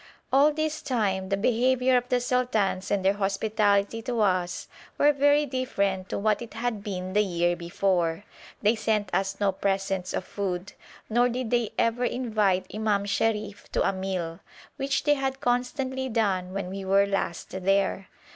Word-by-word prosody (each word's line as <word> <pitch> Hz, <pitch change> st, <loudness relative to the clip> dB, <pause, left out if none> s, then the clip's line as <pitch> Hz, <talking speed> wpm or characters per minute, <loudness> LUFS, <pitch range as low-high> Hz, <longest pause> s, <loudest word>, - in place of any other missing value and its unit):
All 285 Hz, +3 st, +6 dB
this 310 Hz, 0 st, -2 dB
time 200 Hz, -8 st, -1 dB
the 195 Hz, -, +1 dB
behaviour 250 Hz, +4 st, +2 dB
of 245 Hz, 0 st, +1 dB
the 250 Hz, -, +2 dB
sultans 240 Hz, -6 st, 0 dB
and 200 Hz, -2 st, 0 dB
their 195 Hz, -, +5 dB
hospitality 205 Hz, +1 st, +1 dB
to 240 Hz, 0 st, -3 dB
us 185 Hz, -3 st, 0 dB, 0.3 s
were 295 Hz, +1 st, +5 dB
very 290 Hz, +1 st, +4 dB
different 200 Hz, -8 st, -1 dB
to -, -, -2 dB
what 210 Hz, +1 st, +1 dB
it 235 Hz, -, -9 dB
had 225 Hz, -3 st, -2 dB
been 185 Hz, -2 st, -4 dB
the 210 Hz, -, +4 dB
year 175 Hz, -3 st, +1 dB
before; 175 Hz, 0 st, 0 dB, 0.4 s
they 210 Hz, +2 st, +5 dB
sent 215 Hz, -4 st, -1 dB
us 195 Hz, 0 st, 0 dB
no 200 Hz, -1 st, +2 dB
presents 195 Hz, -1 st, -1 dB
of 185 Hz, -, -3 dB
food, 190 Hz, -1 st, -4 dB, 0.3 s
nor 240 Hz, +2 st, +3 dB
did 245 Hz, -1 st, -3 dB
they 240 Hz, -3 st, +2 dB
ever 230 Hz, +2 st, +1 dB
invite 215 Hz, -7 st, +1 dB
Imam 210 Hz, -2 st, 0 dB
Sharif 210 Hz, 0 st, -1 dB
to -, -, +2 dB
a -, -, +1 dB
meal, 185 Hz, -3 st, -3 dB, 0.4 s
which 275 Hz, 0 st, -1 dB
they 295 Hz, -, +4 dB
had 270 Hz, -1 st, -2 dB
constantly 260 Hz, +2 st, -1 dB
done 195 Hz, -6 st, 0 dB
when 190 Hz, -1 st, -4 dB
we 195 Hz, 0 st, -5 dB
were 195 Hz, +1 st, +4 dB
last 195 Hz, -4 st, -3 dB
there. 195 Hz, 0 st, 0 dB
205 Hz, 165 wpm, -26 LUFS, 190-245 Hz, 0.4 s, All